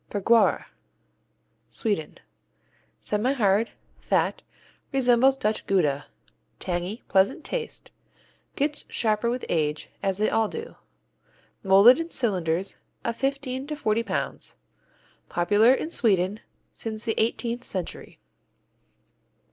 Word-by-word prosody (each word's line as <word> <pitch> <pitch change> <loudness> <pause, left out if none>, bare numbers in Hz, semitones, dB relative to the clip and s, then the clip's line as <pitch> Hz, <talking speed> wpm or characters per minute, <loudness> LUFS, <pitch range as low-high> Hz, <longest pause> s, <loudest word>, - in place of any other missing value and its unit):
Bergquara 225 +3 +3 1.0
Sweden 205 -9 -2 0.9
Semihard, 215 -1 +1 0.3
fat, - - 0 0.5
resembles 265 0 +4
Dutch 215 -4 -1
Gouda. 150 -8 +1 0.5
Tangy, 180 +5 -4
pleasant 195 +9 +2
taste. 465 -2 -5 0.6
Gets 290 +1 -1
sharper 220 0 +1
with 250 +1 -3
age, 150 -2 -1
as 195 -1 0
they 215 +1 +2
all 225 -1 +2
do. 455 - -7 0.9
Molded 200 +7 +7
in 330 0 -3
cylinders 190 - 0 0.3
of 235 - -1
fifteen 270 0 -2
to 300 - -3
forty 220 -6 0
pounds. 230 - -3 0.7
Popular 205 +7 +4
in 310 +5 0
Sweden 200 - +2 0.3
since 220 -1 -6
the 225 - +1
eighteenth 235 +2 -1
century. 185 -7 -6
220 Hz, 100 wpm, -26 LUFS, 195-255 Hz, 1.0 s, Molded